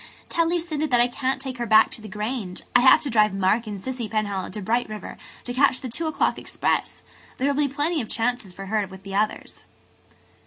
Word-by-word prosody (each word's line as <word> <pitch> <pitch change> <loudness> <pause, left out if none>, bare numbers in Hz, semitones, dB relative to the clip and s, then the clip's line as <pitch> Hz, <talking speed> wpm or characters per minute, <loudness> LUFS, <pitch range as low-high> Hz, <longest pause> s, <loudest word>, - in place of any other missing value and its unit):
"Tell 335 -1 +1
Lucinda 330 -3 -1
that 245 -4 +3
I 240 - +5
can't 260 +1 -2
take 265 -2 -6
her 235 - -2
back 220 0 +6
to - - -6
the 215 - -9
Grange. 210 -2 -4
I - - +8
have 260 +1 +7
to 285 - -3
drive 210 -3 +3
Mark 200 +4 +1
and 205 -2 -5
Cissy 245 +1 -4
Penhallow 205 -3 -2
to 200 - -6
Bright 230 +4 0
River 215 -1 -7 0.3
to 245 - -5
catch 265 0 +3
the 255 - -6
two 320 +8 -1
o'clock 315 - 0
express. - - -2 0.3
There 265 - 0
will 285 +1 +2
be - - -8
plenty 300 +3 0
of 220 - -7
chances 230 -4 -1
for 195 +2 -9
her 210 0 0
with 190 0 -12
the 195 0 -8
others." 210 +2 -2
235 Hz, 225 wpm, -24 LUFS, 210-265 Hz, 0.3 s, I